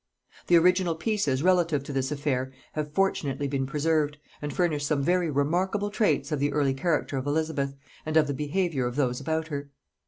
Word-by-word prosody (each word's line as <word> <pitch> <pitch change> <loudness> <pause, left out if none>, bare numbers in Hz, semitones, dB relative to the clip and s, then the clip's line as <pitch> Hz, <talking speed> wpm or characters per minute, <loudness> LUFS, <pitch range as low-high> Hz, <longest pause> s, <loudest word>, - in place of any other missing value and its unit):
The 175 - +5
original 180 0 +3
pieces 160 - 0
relative 170 -6 +3
to 140 - -6
this 135 +1 -1
affair 135 -3 -1 0.2
have 150 -1 -3
fortunately 145 -6 0
been 135 -1 -1
preserved, 150 0 0 0.2
and 145 0 -3
furnish 155 -3 0
some 145 -1 0
very 175 +2 +2
remarkable 180 +8 0
traits 155 - +1
of 150 - 0
the 145 +1 +1
early 140 -2 +2
character 145 -1 0
of 130 +2 -3
Elizabeth, 145 -2 -1 0.3
and 155 0 0
of 155 - +5
the 145 - -2
behaviour 150 -2 -1
of 120 - -5
those 125 -4 0
about 160 0 -2
her. 140 -1 -5
150 Hz, 185 wpm, -27 LUFS, 140-170 Hz, 0.3 s, The